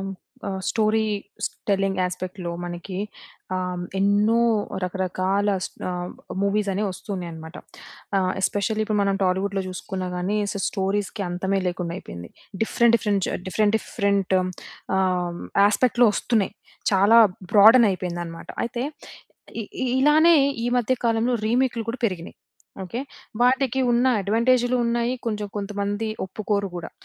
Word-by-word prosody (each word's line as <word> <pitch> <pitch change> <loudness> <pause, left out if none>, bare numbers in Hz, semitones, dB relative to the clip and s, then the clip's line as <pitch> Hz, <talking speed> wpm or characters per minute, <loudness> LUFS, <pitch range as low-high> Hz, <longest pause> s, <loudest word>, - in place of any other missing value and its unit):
హ్మ్, 195 - -4 0.4
ఆహ్, 190 -1 -3
stories 215 -2 0 0.2
telling 195 -1 +1
యాస్పెక్ట్‌లో 180 0 -4
మనకి 175 +2 -6 0.6
ఆహ్, 180 -1 -3
ఎన్నో 205 +4 +3 0.4
రకరకాల 190 +2 -1 0.2
స్ - - -11 0.2
ఆహ్, 180 0 -4 0.3
మూవీస్ 200 +1 +1
అనేవి 205 +2 0
వస్తున్నాయి 185 -2 -5
అన్నమాట. 160 +1 -9 0.6
ఆహ్, 185 -1 +1
ఎస్పెషల్లీ 215 +3 0
ఇప్పుడు 215 -1 0
మనం 195 -1 +1
టాలీవుడ్‌లో 190 +2 0
చూసుకున్నా 185 0 -5
గాని, 185 +4 -1 0.2
సో - - -4
స్టోరీస్‌కి 200 +1 -2
అంతమే 190 +2 -1
లేకుండా 175 -1 -3
అయిపోయింది. 85 - -9 0.3
డిఫరెంట్, 235 +1 +3
డిఫరెంట్ 205 -4 0
జ - - -2
డిఫరెంట్, 210 +3 +1
డిఫరెంట్ 200 -3 0 0.6
ఆహ్, 180 -2 0 0.3
ఆస్పెక్ట్‌లో 240 +2 +3
ఒస్తున్నాయి. 220 -6 0 0.4
చాలా 200 +4 +6 0.3
బ్రా‌డెన్ 220 +3 +8
అయిపోయింది 180 -2 -4
అన్నమాట. 165 0 -9 0.2
అయితే, 240 +1 -3 0.8
ఇ - - -6 0.4
ఇలానే 310 +4 +6 0.3
ఈ - - 0
మధ్య 245 +1 +1
కాలంలో 230 +2 +2
రీమేక్‌లు 245 0 +1
కూడా 250 - -7
పెరిగినయి. 180 -5 -6 0.5
ఓకె. 210 +7 -4 0.4
వాటికి 260 +1 +3
ఉన్న 240 +2 +3
అడ్వాంటేజులు 240 +5 +2
ఉన్నాయి. 235 +1 0
కొంచెం 210 -2 -2
కొంతమంది 205 +1 -2 0.2
ఒప్పుకోరు 200 +1 -2
కూడా. 170 - -6
200 Hz, 125 wpm, -24 LUFS, 185-225 Hz, 0.8 s, బ్రా‌డెన్